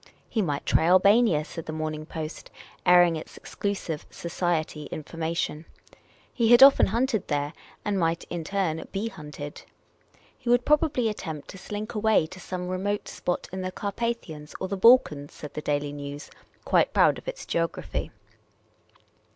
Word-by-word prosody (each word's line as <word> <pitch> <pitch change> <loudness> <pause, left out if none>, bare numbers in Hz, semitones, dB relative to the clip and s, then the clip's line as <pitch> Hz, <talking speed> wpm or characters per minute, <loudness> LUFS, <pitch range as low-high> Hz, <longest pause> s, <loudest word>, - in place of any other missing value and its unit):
He 220 - 0
might 145 -7 -2
try 160 - +3
AJbania, 185 -2 +5
said 165 0 -8
the - - -3
Morning 155 -1 -4
Post, 160 -1 -6 0.4
airing 175 -2 +6
its 155 - -10
exclusive 190 -6 -4
"society" 170 -3 -2
information; 160 +1 -3 0.7
he 230 -3 +2
had 240 +2 +9
often 275 0 +8
hunted 230 0 0
there, 145 0 -1 0.3
and 205 -2 0
might 165 0 0
in 170 -2 -5
turn 170 -3 -1
be 205 +3 -2
hunted. 150 -5 -8 0.7
He 245 - -6
would 245 0 +4
probably 295 -5 +3
attempt 160 -8 -5
to 195 - -9
slink 210 +4 -5
away 215 -5 +3
to 185 +4 -11
some 180 0 -5
remote 195 +3 -2
spot 175 - -3
in 190 - -3
the 185 0 -3
Carpathians 200 -7 -4
or 190 - -2
the 200 - -2
Balkans, 190 - +4
said 150 - -9
the 150 - -4
Daily 145 -1 -1
Nczvs, 145 0 -7 0.3
quite - - +3
proud - - +4
of - - -19
its - - -5
geography. 165 0 -2
175 Hz, 155 wpm, -26 LUFS, 155-210 Hz, 0.7 s, had